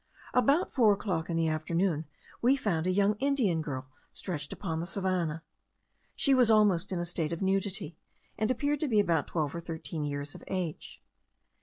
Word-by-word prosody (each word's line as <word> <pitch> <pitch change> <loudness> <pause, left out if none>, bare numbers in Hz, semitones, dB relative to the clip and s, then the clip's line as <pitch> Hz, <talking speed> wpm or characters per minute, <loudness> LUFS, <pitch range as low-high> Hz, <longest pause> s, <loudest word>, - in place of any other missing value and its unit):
About 275 +8 +3
four 225 -5 +5
o'clock 180 -5 -2
in 165 - 0
the 165 -1 +2
afternoon, 160 +1 0 0.4
we 255 +3 +5
found 180 -10 -1
a - - +3
young 200 +2 +3
Indian 255 - +1
girl 140 -3 -4 0.3
stretched 150 -6 -5
upon 160 -5 -3
the 170 - -3
savannah. 180 -5 -1 0.7
She 275 - +3
was 250 -3 +5
almost 205 -4 +4
in 185 - -1
a 175 - -2
state 165 -2 -2
of 170 +3 -3
nudity, 190 -4 -1 0.4
and 215 0 0
appeared 285 +4 0
to 310 - 0
be 220 -5 +3
about 170 -7 +2
twelve 155 -4 -1
or 170 - -4
thirteen 165 -2 -5
years 145 0 -3
of - - -11
age. 180 -5 -4
180 Hz, 180 wpm, -30 LUFS, 160-210 Hz, 0.7 s, four